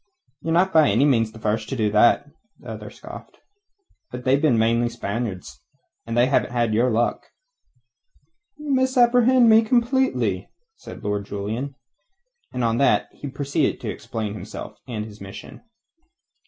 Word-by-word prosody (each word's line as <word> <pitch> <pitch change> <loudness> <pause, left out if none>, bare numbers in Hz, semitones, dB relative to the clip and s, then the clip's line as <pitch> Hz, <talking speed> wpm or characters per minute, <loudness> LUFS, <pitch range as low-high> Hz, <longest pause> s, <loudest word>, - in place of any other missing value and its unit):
"Ye're 165 - -3
not 185 +3 +2
by 155 -7 +5
any 115 +8 +3
means 115 -6 +2
the 110 - -13
first 110 0 -2
to - - -3
do 110 -4 0
that," 110 +6 +4 0.3
the - - -12
other - - -8
scoffed. - - -12 0.7
"But 125 0 -7
they've 135 +2 +2
mainly 115 -6 +3
been 120 0 +1
Spaniards, 100 - -5 0.5
and 115 0 -3
they 120 - +5
hadn't 120 -3 +1
your 120 +4 +3
luck." 120 +1 0 1.3
"You 300 -2 -3
misapprehend 250 -1 +4
me 220 0 +7
completely," 230 - 0 0.3
said 415 - -11
Lord 105 -1 -2
Julian. 110 +8 -4 0.8
And 125 -1 -3
on 115 +1 +1
that 140 - +2
he 145 - -9
proceeded 140 +1 -1
to - - -3
explain 110 -3 -5
himself 105 - -8
and 110 -4 -4
his 105 -2 -13
mission. 95 0 -10
120 Hz, 150 wpm, -23 LUFS, 110-155 Hz, 1.3 s, me